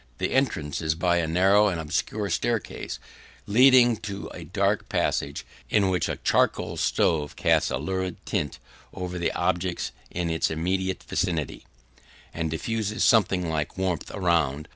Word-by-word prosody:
The - - -2
entrance 90 - 0
is 80 0 0
by 85 +1 +2
a 85 -2 0
narrow 95 +5 +4
and 90 -4 -1
obscure 90 +5 -2
staircase 115 +4 -2 0.5
leading 120 +1 +6
to 100 -2 -6
a 90 - -8
dark 100 +5 0
passage, - - -1 0.2
in 100 -3 +3
which 90 -1 0
a - - -1
charcoal - - +1
stove 75 -3 +1
casts - - +2
a - - -1
lurid 95 -2 -3
tint 75 -4 -2 0.4
over 90 -1 -4
the 85 - 0
objects 90 0 -1 0.2
in 85 -1 -2
its 80 - +1
immediate 95 +4 -1
vicinity, 85 -6 -2 0.7
and 80 -1 -2
diffuses 110 +6 -2
something 95 -6 +3
like 80 0 -2
warmth 95 -4 -2
around. 80 -6 0
90 Hz, 145 wpm, -26 LUFS, 80-100 Hz, 0.7 s, leading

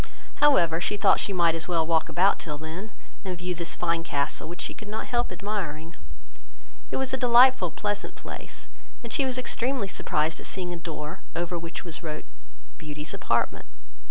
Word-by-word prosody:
However, 170 - +5
she 205 - 0
thought 195 - +5
she - - +2
might 170 -3 +4
as 165 0 -3
well 170 -3 +2
walk 165 0 +2
about 190 +3 +4
till 150 -2 -4
then, 165 +8 -6 0.3
and 185 -3 -3
view 180 +1 -2
this 170 -1 -3
fine 170 -1 +1
castle, 150 -1 -1
which 175 0 -6
she - - -1
could 215 - -10
not 215 +1 -3
help 240 -1 0
admiring; 170 -6 -4 0.9
it - - -1
was 265 -1 -1
a - - +2
delightful 245 -5 +6
pleasant 205 +4 -3
place, - - -7 0.4
and 235 -2 -5
she 275 - +3
was 255 -1 0
extremely 255 -2 0
surprised 155 -3 0
at - - -4
seeing 180 -2 -2
a - - -3
door, 160 -2 -5 0.2
over 175 +1 -1
which 170 +2 -6
was 170 -1 -3
wrote, 155 -3 -5 0.5
"BEAUTY'S 150 0 -6
APARTMENT." 120 - 0
175 Hz, 185 wpm, -27 LUFS, 160-210 Hz, 0.9 s, delightful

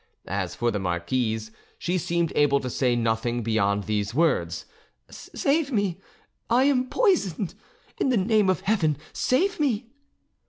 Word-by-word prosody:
As 95 -2 -3
for 120 0 0
the 105 - -2
marquise, 110 +5 -1 0.3
she 180 +1 -1
seemed 170 0 -1
able 140 -1 +4
to 125 - -4
say 125 -1 +1
nothing 115 +1 0
beyond 100 -2 +1
these 105 +2 -2
words: 85 - +1 0.5
"Save 285 0 -1
me! 200 -6 0 0.5
I 245 +3 +4
am 260 -2 +2
poisoned! 215 - +1 0.5
In - - +2
the 250 - +3
name 210 0 +3
of 185 - +1
Heaven, 165 -9 +1 0.2
save 360 +10 +1
me!" 240 -5 0
155 Hz, 145 wpm, -25 LUFS, -, 0.5 s, able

